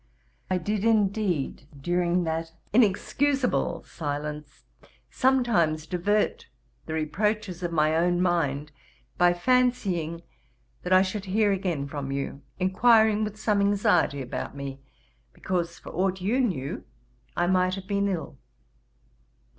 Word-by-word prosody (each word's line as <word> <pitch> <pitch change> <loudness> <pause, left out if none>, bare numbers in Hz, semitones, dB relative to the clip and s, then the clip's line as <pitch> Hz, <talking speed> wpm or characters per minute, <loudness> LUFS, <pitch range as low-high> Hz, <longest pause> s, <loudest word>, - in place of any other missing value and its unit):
I 185 - +1
did, 205 +3 -2
indeed, 200 -10 +1
during 175 +3 +1
that 165 0 -3 0.2
inexcusable 245 -1 +1
silence, 150 -1 -6 0.5
sometimes 230 -13 +2
divert 205 - 0 0.4
the 160 - -3
reproaches 185 +4 -1
of 175 -1 -2
my 155 -1 +2
own 175 +2 +2
mind, 150 -5 0 0.5
by 175 0 +6
fancying 180 -7 +1 0.6
that 180 - -5
I 185 0 +7
should 195 +1 -4
hear 205 +2 +2
again 180 -8 -1
from 140 -2 -5
you, 140 0 -4 0.2
inquiring 215 +3 +4
with 215 0 -5
some 210 -2 +1
anxiety 180 -8 +2
about 130 - -5
me, 135 -1 -6 0.5
because, 175 -2 -2
for - - -10
aught 190 +1 0
you 210 +8 0
knew, 155 - -2 0.5
I 175 - +2
might 185 0 +2
have 195 -1 -8
been 200 0 0
ill. 170 -8 -4
180 Hz, 125 wpm, -26 LUFS, 160-210 Hz, 0.6 s, I